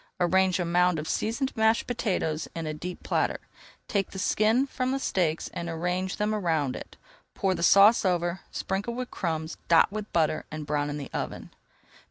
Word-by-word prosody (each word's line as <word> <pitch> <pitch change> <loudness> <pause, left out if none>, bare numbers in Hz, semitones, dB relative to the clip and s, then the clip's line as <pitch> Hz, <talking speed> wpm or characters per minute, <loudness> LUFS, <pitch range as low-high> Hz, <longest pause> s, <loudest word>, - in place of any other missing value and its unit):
Arrange 185 +1 +3
a 175 - 0
mound 180 0 +3
of 155 0 -4
seasoned 235 - -1
mashed 220 +1 +3
potatoes 185 -10 -1
in 165 -1 -4
a 155 - -3
deep 175 +4 -7
platter. - - 0 0.5
Take 200 -2 0
the - - -9
skin 220 +7 +2
from 255 -1 -2
the 270 - 0
steaks 175 -11 0
and 170 0 -4
arrange 180 +3 -2
them 210 +1 0
around 160 -10 0
it. - - -9 0.4
Pour 190 -1 +1
the 180 - -4
sauce 200 +6 +6
over, 175 -1 0
sprinkle 200 +5 -3
with 250 0 -5
crumbs, 160 -2 -3
dot 170 +2 +5
with 215 0 -5
butter, 155 -2 +1
and 155 -1 -6
brown 145 0 -1
in 145 - -3
the 140 - -7
oven. - - -5
180 Hz, 185 wpm, -27 LUFS, 160-210 Hz, 0.5 s, sauce